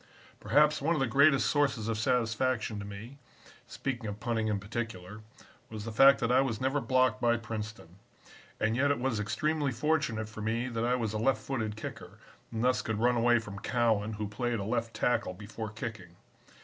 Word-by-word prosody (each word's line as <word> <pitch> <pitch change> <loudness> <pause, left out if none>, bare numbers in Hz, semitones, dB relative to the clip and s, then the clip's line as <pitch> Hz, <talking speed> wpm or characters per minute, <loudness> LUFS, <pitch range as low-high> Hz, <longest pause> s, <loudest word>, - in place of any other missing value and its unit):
"Perhaps 150 +1 +3
one 165 +4 +2
of - - -1
the 135 - +2
greatest 140 +3 +4
sources 140 -7 +1
of 115 - 0
satisfaction 115 -1 0
to 100 - -6
me, 105 +7 -9 0.5
speaking 120 -5 -4
of 105 0 -5
punting 115 -1 -1
in 105 -2 0
particular, 105 -1 -6 0.5
was 110 -1 -7
the 115 - -4
fact 135 +5 +7
that 115 - +1
I 130 +1 +5
was 120 -5 -1
never 135 +2 0
blocked 130 -1 +2
by 120 0 +3
Princeton. 110 -6 -7 0.6
And 110 +1 +1
yet 140 +3 +2
it 145 - +2
was 120 -3 -1
extremely 150 +7 0
fortunate 125 -4 0
for 110 0 -9
me 115 +3 -1
that 115 -1 -2
I 125 +1 +2
was 115 -4 -2
a 110 - -2
left 115 -1 +1
footed 110 -5 -3
kicker 110 - -8 0.3
and 115 0 -2
thus 125 0 +2
could 110 -1 -3
run 120 +3 +3
away 120 +1 +4
from 105 -3 -6
Cowan, 110 -3 +1
who 105 0 -4
played 120 +3 -2
a 100 - -3
left 115 +2 -2
tackle 95 -6 0
before 105 +2 -7
kicking. 105 -5 -7
115 Hz, 195 wpm, -30 LUFS, 110-130 Hz, 0.6 s, fact